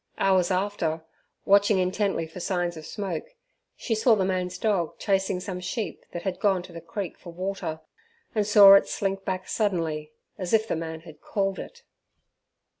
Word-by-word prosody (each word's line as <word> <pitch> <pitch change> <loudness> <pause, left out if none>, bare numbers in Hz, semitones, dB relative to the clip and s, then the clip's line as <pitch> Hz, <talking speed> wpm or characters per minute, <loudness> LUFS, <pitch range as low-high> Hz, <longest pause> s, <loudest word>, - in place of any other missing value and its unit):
Hours 190 -2 +3
after, 180 -4 -1 0.4
watching 200 +1 +5
intently 185 -1 0
for 160 +3 -10
signs 175 -1 -1
of 155 -1 -9
smoke, 205 - -5 0.4
she 235 - -2
saw 225 +1 +4
the 195 -3 +1
man's 185 -1 -1
dog 190 -5 0
chasing 195 -2 0
some 180 0 -5
sheep 180 0 -4
that 175 - -6
had 185 -2 -3
gone 195 -3 +2
to 180 - -12
the 165 - -8
creek 175 +3 -6
for 175 - -10
water, 180 -3 -4 0.5
and 210 -3 +1
saw 205 -2 +9
it 200 - +6
slink 195 -2 -2
back 185 -1 -3
suddenly, 165 -7 -1 0.3
as 185 0 -3
if 220 0 +1
the - - -1
man 160 0 -5
had 160 -3 -14
called 195 -1 -1
it. 480 -1 -10
190 Hz, 175 wpm, -26 LUFS, 175-200 Hz, 0.5 s, saw